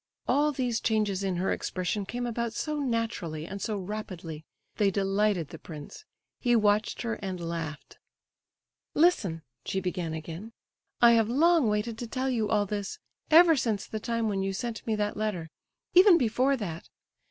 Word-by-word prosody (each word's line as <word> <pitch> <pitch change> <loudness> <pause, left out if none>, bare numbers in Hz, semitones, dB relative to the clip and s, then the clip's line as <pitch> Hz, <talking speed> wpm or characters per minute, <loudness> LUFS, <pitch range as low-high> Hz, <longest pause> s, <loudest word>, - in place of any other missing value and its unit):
All 295 +1 +3
these 250 -5 -1
changes 210 -3 +1
in 190 -2 0
her 180 +2 0
expression 190 +2 -2
came 245 +2 -3
about 235 -1 -2
so 300 +3 -2
naturally 225 - -2
and 195 +3 -7
so 215 -2 -2
rapidly—they 185 -1 -4
delighted 195 -3 +1
the 165 - -9
prince; 155 - -10 0.3
he 240 -2 +3
watched 210 0 +2
her, 230 -2 -2
and 190 -2 -4
laughed. 165 -3 -5 1.0
"Listen," 200 - +3 0.2
she 190 - -1
began 180 -3 -3
again; 165 +8 -7 0.5
"I 235 - +9
have 225 -2 +4
long 315 0 +4
waited 215 +2 -1
to 240 - -4
tell 260 +3 -1
you 220 -4 0
all 210 -2 +2
this, 205 - -4 0.3
ever 325 +1 +8
since 225 -7 -1
the 220 - -5
time 230 +1 -1
when 195 -2 0
you 195 0 -1
sent 235 +3 -5
me 220 - +1
that 210 0 -1
letter—even 215 - +2
before 255 +1 +2
that. 170 -8 -6
210 Hz, 160 wpm, -28 LUFS, 185-235 Hz, 1.0 s, I